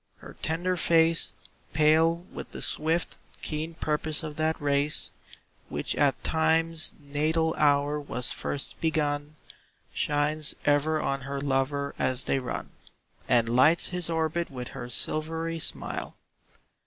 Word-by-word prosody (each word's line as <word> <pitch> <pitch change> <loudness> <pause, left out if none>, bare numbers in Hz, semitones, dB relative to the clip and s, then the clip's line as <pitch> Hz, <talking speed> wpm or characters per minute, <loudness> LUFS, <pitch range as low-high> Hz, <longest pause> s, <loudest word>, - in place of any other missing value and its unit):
Her - - -13
tender 175 +3 -1
face, 165 0 +3 0.4
Pale 160 +3 +3
with - - -8
the - - -7
swift, 160 +3 -1 0.3
keen 160 +2 -4
purpose 155 +1 -2
of 155 -2 -6
that 160 0 0
race 145 +1 0 0.6
Which - - -3
at 145 -2 +1
Time's 160 0 +2
natal 155 +3 0
hour 145 0 +2
was 125 -4 -3
first 140 - -2
begun, 150 -2 -1 0.6
Shines 150 +1 +3
ever 145 +2 +2
on 135 -2 -2
her 140 +1 -4
lover 140 +1 -1
as 130 0 0
they 135 - 0
run 125 - -5 0.6
And 120 -2 +3
lights 130 +8 +5
his 180 -2 +1
orbit 165 +1 -1
with 125 -2 -7
her 120 - -7
silvery 160 +5 0
smile. - - 0
155 Hz, 130 wpm, -27 LUFS, 140-160 Hz, 0.6 s, lights